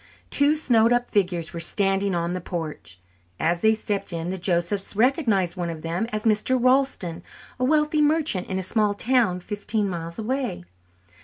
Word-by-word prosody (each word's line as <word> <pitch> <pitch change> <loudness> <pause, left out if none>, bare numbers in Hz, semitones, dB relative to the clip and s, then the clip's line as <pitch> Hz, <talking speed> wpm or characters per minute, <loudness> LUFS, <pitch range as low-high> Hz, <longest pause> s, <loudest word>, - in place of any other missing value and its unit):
Two 285 +2 +5
snowed 235 -7 +3
up 245 0 +1
figures 180 -5 0
were 170 - -5
standing 195 +2 +1
on 170 0 -1
the 180 - -4
porch. 150 - -6 0.4
As 170 +2 0
they 220 0 +4
stepped 200 -3 -3
in, 170 +1 -3
the 190 - -3
Josephs 180 +3 -1
recognized 220 - +2
one 175 -2 -3
of 160 -2 -7
them 170 +7 -2
as 215 +1 -3
Mr. 220 +4 +2
Ralston, 255 -9 +1 0.4
a - - -1
wealthy 300 +2 +2
merchant 300 - +1
in 190 - -3
a 190 - -2
small 210 +1 +1
town 220 -6 +1
fifteen 210 +2 -2
miles 170 -2 -5
away. 245 - -3
200 Hz, 170 wpm, -24 LUFS, 175-245 Hz, 0.4 s, Two